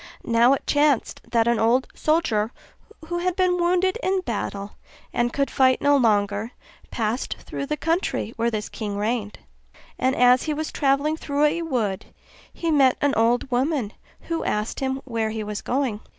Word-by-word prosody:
Now 235 +2 +4
it 275 - -3
chanced 290 -4 +1
that 230 -1 +2
an 235 -2 +2
old 240 +4 +2
soldier, 240 -9 +1 0.6
who 345 0 -1
had 360 0 -1
been 365 -1 +2
wounded 365 +4 +1
in 380 0 +1
battle 205 - -4 0.4
and 240 0 +1
could 275 +1 -1
fight 260 -1 +3
no 285 0 +4
longer, 210 -2 +1 0.4
passed 225 +2 -2
through 280 - -6
the 300 - -2
country 325 - -1
where 230 +1 +1
this 215 -2 -3
king 205 -2 -5
reigned: 210 0 -2 0.6
and 260 +1 +1
as 250 +1 +5
he 305 -1 -1
was 310 +1 -3
travelling 285 +3 +1
through 290 -2 -1
a 325 +3 +1
wood, 235 - -2 0.4
he 335 -1 -2
met 270 -4 +4
an 285 -1 +2
old 240 +4 +1
woman, 255 -3 0 0.3
who 330 -1 -3
asked 210 +1 -2
him 265 0 -2
where 230 -3 -1
he 220 0 -4
was 210 -1 -5
going. 250 -5 -1
255 Hz, 170 wpm, -23 LUFS, 225-300 Hz, 0.6 s, as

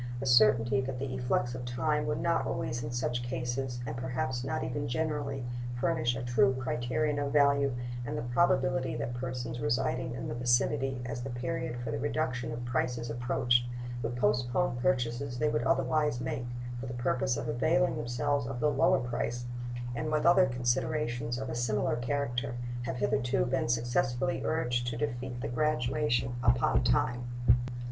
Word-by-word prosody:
The 135 - -3
certainty 120 +1 +5
that 130 0 -4
the 130 0 -3
efflux 125 -1 0
of 125 0 -5
time 150 +5 0
would 150 - 0
not 170 -1 +1
always 120 0 -2
in 115 - -3
such 120 0 -1
cases, 125 0 -3
and 115 0 -4
perhaps 130 0 -2
not 135 - -2
even 145 +3 -2
generally, 140 -2 -2 0.3
furnish 120 0 +1
a 130 - -4
true 125 +2 +3
criterion 130 +3 -1
of 140 -1 -1
value, 140 -1 +4 0.3
and 120 - -3
the - - -2
probability 130 -2 +2
that 120 +1 -3
persons 120 -1 -4
residing 120 +2 0
in - - -4
the - - -3
vicinity, 120 +1 +1
as 120 0 -4
the 135 - -4
period 125 0 -3
for 120 -2 -4
the - - -2
reduction 130 -5 -1
of 120 +1 -5
prices 120 -1 -1
approached, 120 0 +2 0.3
would 120 +1 -2
postpone 125 +5 +1
purchases 125 0 0
they 115 -1 +2
would 115 +2 0
otherwise 135 +1 +2
make, 125 -1 -3 0.3
for 130 - -5
the 125 - -5
purpose 125 +1 0
of - - -3
availing 155 +6 +2
themselves 125 +3 0
of 130 -2 -4
the 150 +2 +3
lower 135 -1 +4
price, 120 0 -2 0.5
with 155 +4 0
other 175 0 +6
considerations 120 -1 -1
of 135 +1 -4
a 125 - -4
similar 120 -3 0
character, 120 -1 -2 0.3
have 130 - -2
hitherto 125 +4 +1
been 130 -1 0
successfully 120 +2 +1
urged 120 -6 0
to 120 -1 -2
defeat 120 +2 -3
the - - -2
graduation 125 -2 +1
upon 120 +1 +3
time. 125 -1 +1
125 Hz, 165 wpm, -31 LUFS, 120-135 Hz, 0.5 s, other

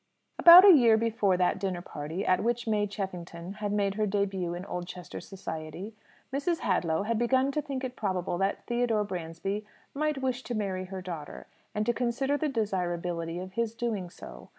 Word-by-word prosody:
About 350 +3 +11
a 395 - +10
year 235 -7 +6
before 220 -4 +1
that 180 +1 +1
dinner 185 -3 -3
party 160 +7 -5
at 185 - +2
which 240 +1 0
May 210 -1 +1
Cheffington 180 -3 -6
had 205 -1 -1
made 200 -1 +1
her 215 +1 0
début 190 -3 -1
in 180 - -7
Oldchester 180 -1 -6
society, 185 +1 -7 0.4
Mrs. 320 +5 0
Hadlow 170 -3 +1
had 225 +1 -1
begun 260 +3 +2
to 300 - -1
think 275 -2 -5
it 255 -1 -4
probable 185 -5 -2
that 195 +1 -1
Theodore 240 -3 +1
Bransby 190 +2 -4 0.3
might 300 0 0
wish 255 -1 -1
to 240 - -3
marry 190 -3 -2
her 190 0 -7
daughter, 155 - -7 0.3
and 210 0 0
to 240 - +2
consider 250 +4 0
the 300 +1 0
desirability 175 -7 -2
of 185 +1 -6
his 230 +2 -2
doing 220 -7 -2
so. 65 - -12
200 Hz, 180 wpm, -29 LUFS, 180-235 Hz, 0.4 s, About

